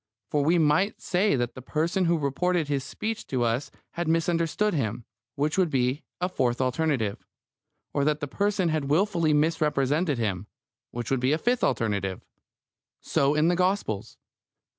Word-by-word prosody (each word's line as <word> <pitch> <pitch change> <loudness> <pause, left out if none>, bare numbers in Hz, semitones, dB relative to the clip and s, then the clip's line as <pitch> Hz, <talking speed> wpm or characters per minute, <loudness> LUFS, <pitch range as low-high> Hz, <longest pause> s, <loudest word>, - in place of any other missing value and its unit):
For 145 -1 +2
we 165 +4 +3
might 160 +6 +2
say 185 -1 +1
that 120 -2 -1
the 130 - -9
person 165 +7 0
who 170 0 +3
reported 160 +3 0
his 140 -2 -1
speech 215 +11 -5
to 130 -2 0
us 120 +4 0 0.2
had 170 -1 -3
misunderstood 165 +5 +1
him, 115 -6 -2 0.3
which 150 +5 0
would 180 -3 +3
be 130 +1 0 0.2
a 180 - 0
"fourth 125 -9 0
alternative"; 130 -5 0 0.7
or 140 - +1
that 150 0 +1
the 145 - -3
person 200 +2 0
had 155 -3 -1
wilfully 170 0 +2
misrepresented 150 -1 +1
him, 105 -4 -2 0.4
which 120 +1 -5
would 135 - +2
be 130 +3 +2
a - - +2
fifth 245 +7 0
alternative. 100 -4 -1 0.7
So 140 +2 +1
in 155 +2 +3
the 175 - +3
Gospels. 180 - -1
150 Hz, 160 wpm, -26 LUFS, 130-175 Hz, 0.7 s, we